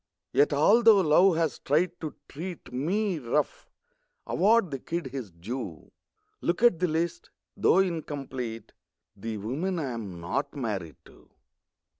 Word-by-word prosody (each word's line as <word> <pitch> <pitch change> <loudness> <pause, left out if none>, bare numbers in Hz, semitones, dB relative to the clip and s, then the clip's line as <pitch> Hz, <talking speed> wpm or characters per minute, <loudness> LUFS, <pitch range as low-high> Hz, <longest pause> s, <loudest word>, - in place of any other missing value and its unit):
Yet 145 - +4
although 205 +8 +6
Love 175 +2 +5
has 165 -3 0
tried 160 +5 +2
to 155 -2 -5
treat 170 -2 -8
Me 180 +7 0
rough, 140 +3 -1 0.6
award 210 -3 +3
the 135 - -3
kid 170 +4 -4
his 130 -5 -5
due. 90 - -7 0.5
Look 175 +6 -1
at 235 -9 +5
the 180 - +2
list, 165 +1 -2 0.3
though - - +4
incomplete: 140 -10 -2 0.4
The 110 +2 -5
women 145 - -2
I'm 115 - -4
not 90 - -3
married 100 - -3
to. - - -19
150 Hz, 130 wpm, -28 LUFS, 120-180 Hz, 0.6 s, although